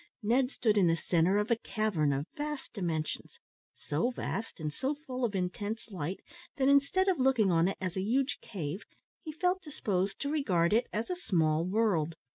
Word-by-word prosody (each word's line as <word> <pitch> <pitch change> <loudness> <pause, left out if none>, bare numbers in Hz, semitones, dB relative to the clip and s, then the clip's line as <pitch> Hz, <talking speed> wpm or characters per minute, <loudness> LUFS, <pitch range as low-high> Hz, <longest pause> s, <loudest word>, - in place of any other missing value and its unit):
Ned 250 +4 +3
stood 215 -6 +2
in 185 - +5
the 165 - +4
centre 170 +3 +2
of 210 +3 0
a - - +6
cavern 215 -10 0
of 140 +1 -1
vast 295 -1 -5
dimensions 165 -6 -3 0.4
so 150 +11 -1
vast, 230 -4 -4
and 150 -1 -3
so 270 - -1
full 260 -4 -6
of 220 -4 0
intense 205 +5 -3
light, 180 0 -4 0.4
that 265 -1 +2
instead 280 +7 +4
of 370 -5 +2
looking 255 -7 +4
on 165 +1 +4
it 195 - -2
as 185 -2 -3
a 190 - 0
huge 260 +7 +1
cave, 180 -1 -5 0.4
he 315 - -6
felt 360 +4 0
disposed 205 - -2
to 280 - -1
regard 185 - +2
it 230 +3 +3
as 220 +10 -2
a - - 0
small 165 - +1
world. 185 -6 +1
210 Hz, 190 wpm, -31 LUFS, 175-265 Hz, 0.4 s, a